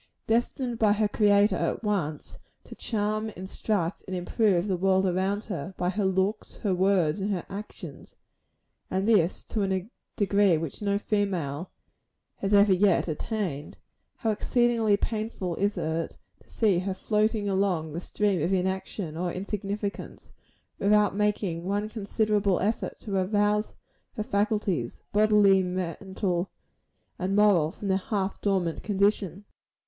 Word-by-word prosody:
Destined 240 +1 0
by 210 -2 +4
her 210 0 +2
Creator 205 -2 +3
at 170 +7 -1
once 175 -8 -2 0.2
to - - -11
charm, 215 0 -2
instruct 190 -1 -2
and 190 - -3
improve 185 0 +1
the 190 - +1
world 190 +1 +2
around 190 +3 0
her, 190 -2 -5
by 180 +1 0
her 200 +1 -1
looks, 190 +3 0
her 200 -3 +2
words 185 -3 +2
and 200 - -1
her 185 -4 -2
actions 205 +2 -8 0.7
and 190 +2 -1
this 195 -6 +3
to 215 - -3
a 190 -1 -1 0.3
degree 200 -4 +3
which 160 +2 -5
no 200 -1 +1
female 185 -7 -1 0.7
has 195 - -2
ever 200 -1 +6
yet 185 -1 +3
attained 165 -2 -3 0.4
how 225 -3 -1
exceedingly 230 -1 +2
painful 215 -5 -3
is 200 +1 0
it 160 +1 -2 0.2
to - - -24
see 205 -6 +2
her 190 +1 -3
floating 215 +1 0
along 190 -6 0
the 170 - -4
stream 200 -3 0
of 170 - 0
inaction 190 -2 -2
or 175 +1 -2
insignificance, 200 +2 -5 0.5
without 205 0 +3
making 200 -5 0
one 205 +3 -1
considerable 210 -2 0
effort 215 +4 -1
to 200 -3 -5
arouse 205 +2 +1 0.4
her 215 - -1
faculties 200 - -1
bodily, 210 -2 +5
mental 185 0 -2 0.7
and 190 +2 -1
moral 200 -7 +4
from 200 - -7
their 190 -1 +3
half 195 -1 -2
dormant 185 -5 0
condition. 200 -1 0
200 Hz, 140 wpm, -27 LUFS, 185-210 Hz, 0.7 s, ever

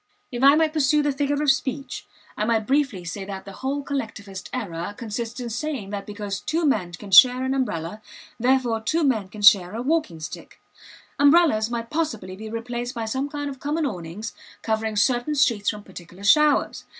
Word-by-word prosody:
If 240 -1 -4
I 280 +2 +7
might 315 -1 +2
pursue 300 -1 +3
the 290 - +1
figure 285 +1 -1
of 290 - +5
speech, 275 +1 -4 0.3
I - - -2
might 220 -1 +1
briefly 265 -8 0
say 195 +4 -5
that 195 -1 -7
the 200 - -8
whole 275 +6 -3
Collectivist 210 -8 -5
error 205 -5 -4
consists 230 +1 -5
in 240 -2 -5
saying 245 -5 -4
that 200 -1 -5
because 205 -1 -5
two 320 +2 -1
men 195 -11 0
can 195 +2 -9
share 255 +3 +8
an 260 0 0
umbrella, 210 -7 -3 0.4
therefore 245 -2 +2
two 320 +8 0
men 220 -9 +1
can 210 +1 -9
share 200 -2 +6
a 230 - -3
walking 295 - 0
stick. 155 - -9 0.6
Umbrellas 285 -7 +4
might 230 -1 -4
possibly 230 - -2
be 215 +3 -8
replaced 240 +2 -4
by 230 -1 -3
some 265 +6 -2
kind 290 0 -4
of 270 -2 -7
common 300 +3 -1
awnings 190 -2 -5 0.3
covering 220 -1 -1
certain 245 +7 +1
streets 230 -7 +2
from 210 -1 -5
particular 180 0 -12
showers. 300 +8 +3
235 Hz, 185 wpm, -24 LUFS, 205-280 Hz, 0.6 s, share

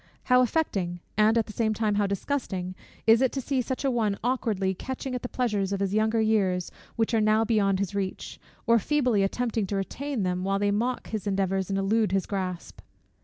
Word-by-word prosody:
How 250 0 +5
affecting, 195 - 0 0.2
and 215 +2 +4
at 225 - +2
the 215 - -10
same 220 -1 0
time 215 -1 +1
how 205 0 +1
disgusting, 195 -3 -3 0.3
is 225 +2 +6
it 260 - +3
to 275 - -2
see 265 0 0
such 260 +3 -3
an 270 - +2
one 215 -4 0
awkwardly 220 -6 0
catching 260 +5 -5
at 250 - -3
the 245 - -5
pleasures 210 -6 -1
of 200 - -1
his 195 0 -1
younger 220 +1 +2
years, 195 -5 +1 0.2
which 225 0 0
are 225 - +3
now 215 +1 +3
beyond 200 -4 +2
his 200 0 -2
reach; 195 -2 -4 0.3
or 230 -1 +5
feebly 250 -5 +1
attempting 220 +1 -1
to 200 - -2
retain 255 +5 -3
them, 180 0 -1
while 195 +1 +1
they 205 0 +1
mock 240 +5 -1
his 215 -2 -4
endeavours 195 -1 0
and 195 - 0
elude 205 +1 +1
his 195 -1 +1
grasp! 185 -3 -4
215 Hz, 210 wpm, -27 LUFS, 195-235 Hz, 0.3 s, is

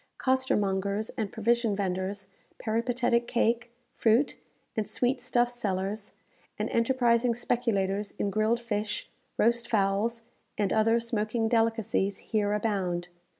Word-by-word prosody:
Costermongers 210 -6 +1
and 210 -3 -3
provision 235 -1 +1
vendors, 190 0 -2 0.3
peripatetic 235 +1 0
cake, 240 0 +1 0.2
fruit, 230 +5 +3 0.4
and 215 -2 -1
sweet 250 +3 +1
stuff 245 -1 +2
sellers, 205 -3 -3 0.4
and - - -2
enterprising 235 0 +2
speculators 210 -5 -1
in 200 - -1
grilled 215 +3 +2
fish, 210 -3 -3 0.3
roast 235 +1 +2
fowls, 215 +2 +1 0.3
and 205 -2 +1
other 225 +1 +4
smoking 225 -1 -1
delicacies, 225 -4 +1
here 210 -2 -1
abound. 190 -5 -1
225 Hz, 110 wpm, -28 LUFS, 200-235 Hz, 0.4 s, other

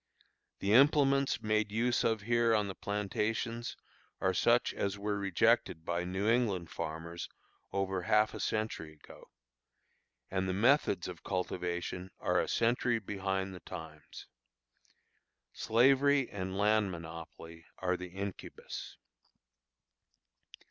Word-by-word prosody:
The 100 +2 +2
implements 140 +1 +4
made 110 -1 +1
use 120 +3 +1
of 110 -2 +1
here 115 +1 +3
on 105 -1 +1
the 95 - -4
plantations 105 +4 -2 0.4
are 95 -1 +1
such 120 +6 +3
as 100 0 -2
were 100 0 -2
rejected 85 -4 +2
by 85 +1 -1
New 95 +3 -2
England 110 -8 +1
farmers 80 +2 -5 0.4
over 95 -1 -1
half 105 +3 +3
a - - -6
century 110 -8 -2
ago; 75 - -16 1.0
and 95 0 0
the - - 0
methods 110 - +3
of 90 -2 -8
cultivation 90 0 -3
are - - +1
a - - 0
century 120 +1 +2
behind 95 -2 -3
the 90 - -8
times. 80 -3 -10 1.3
Slavery 135 +4 +4
and 95 -1 -4
land 105 0 +3
monopoly 80 0 -9
are 90 0 0
the 90 0 -7
incubus. 95 +1 -7
100 Hz, 120 wpm, -32 LUFS, 90-115 Hz, 1.3 s, implements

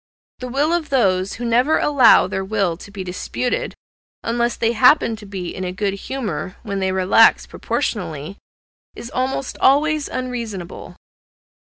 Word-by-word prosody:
The 255 - -5
will 285 +6 0
of 340 -3 -1
those 195 -8 +1
who 240 - -6
never 245 +6 +3
allow 280 -5 +5
their 190 - -3
will 195 -4 -1
to 190 - -13
be 200 -1 -7
disputed, 185 +7 -3 0.5
unless 235 +1 0
they 230 - 0
happen 235 0 +4
to 210 -1 -12
be 190 -3 -5
in 185 - -5
a 180 - -3
good 200 +1 -2
humour, 205 -3 -5
when 200 -3 -3
they 190 0 0
relax 190 +4 +4
proportionally, 170 - -4 0.6
is 235 - -9
almost 260 +1 -3
always 300 +2 +3
unreasonable. 230 -8 -6
225 Hz, 150 wpm, -20 LUFS, 190-255 Hz, 0.6 s, allow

